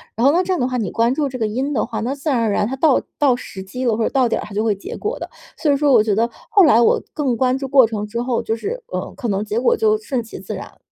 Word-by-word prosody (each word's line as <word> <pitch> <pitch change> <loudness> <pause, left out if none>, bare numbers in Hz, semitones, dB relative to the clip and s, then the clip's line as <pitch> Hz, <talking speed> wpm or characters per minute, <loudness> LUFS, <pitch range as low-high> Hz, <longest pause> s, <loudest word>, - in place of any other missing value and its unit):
然 230 - +1
后 280 - +7
那 350 +4 +2
这 370 0 -1
样 360 - -1
的 - - +2
话， 255 - -2
你 210 -7 -2
关 230 +2 +2
注 290 +1 0
这 255 -1 -6
个 225 - 0
因 260 +7 -2
的 235 - 0
话， - - -5
那 250 +5 -2
自 285 +2 -4
然 260 -4 +2
而 225 -1 +1
然 205 - +1
它 265 +3 -4
到 280 -1 +3 0.2
到 275 -4 +4
时 195 -5 -8
机 250 +7 -6
了 230 -4 +1
或 230 - 0
者 - - +1
到 260 -3 +2
点 - - 0
儿 - - -6
它 210 - -11
就 210 +2 0
会 220 -2 +2
结 195 - -8
果 430 +4 -4
的。 - - -6 0.3
所 300 - +1
以 - - +3
说 285 0 +2
我 240 -4 +6
觉 210 -2 0
得 230 +3 +1 0.2
后 400 - +6
来 285 -9 +6
我 235 - +3
更 275 -5 0
关 255 +2 +1
注 270 0 -4
过 265 -2 +6
程 215 -2 -4
之 230 +3 -4
后， 245 -1 -1
就 225 - -1
是， 450 - -5
呃， - - -4
可 255 - -3
能 200 -1 0
结 215 +2 -2
果 475 - +3
就 435 -1 +2
顺 280 - -3
其 225 - -10
自 - - -6
然 - - -6
了。 - - -21
250 Hz, 365 characters per minute, -20 LUFS, 225-285 Hz, 0.3 s, 后